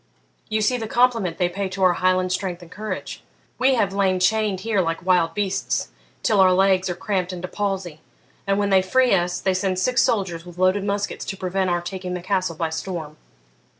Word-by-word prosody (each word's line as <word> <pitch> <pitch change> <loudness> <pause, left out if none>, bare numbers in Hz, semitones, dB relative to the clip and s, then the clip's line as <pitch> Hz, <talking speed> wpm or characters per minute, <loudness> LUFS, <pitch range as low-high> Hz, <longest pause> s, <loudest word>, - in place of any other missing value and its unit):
'You 215 0 0
see 250 +4 +2
the 225 -2 -4
compliment 230 -7 +2
they 180 - +2
pay 190 +2 -3
to 190 0 -3
our 180 -1 +5
Highland 185 0 +1
strength 180 -2 -3
and 165 - -15
courage; 210 +3 -6 0.4
we 260 +1 +4
have 200 -5 +1
lain 190 -2 +1
chained 210 0 +1
here 215 -3 +1
like 165 0 -3
wild 180 -3 +2
beasts, 200 -2 -1 0.3
till 210 -3 +2
our 190 -1 +6
legs 190 0 +3
are 175 - -2
cramped 185 0 -2
into 180 0 -5
palsy, 190 -6 -3 0.5
and 195 0 +2
when 200 -1 0
they 190 -1 +6
free 250 +6 +3
us 175 -1 +1
they 190 - +1
send 185 0 -1
six 250 +7 +2
soldiers 190 -8 0
with 175 0 -12
loaded 185 +2 +2
muskets 200 0 -2
to 195 - -5
prevent 185 0 -1
our 175 0 0
taking 180 0 -5
the 180 - -6
castle 185 -3 -1
by 160 0 -2
storm!' 160 -2 -5
190 Hz, 205 wpm, -22 LUFS, 180-200 Hz, 0.5 s, our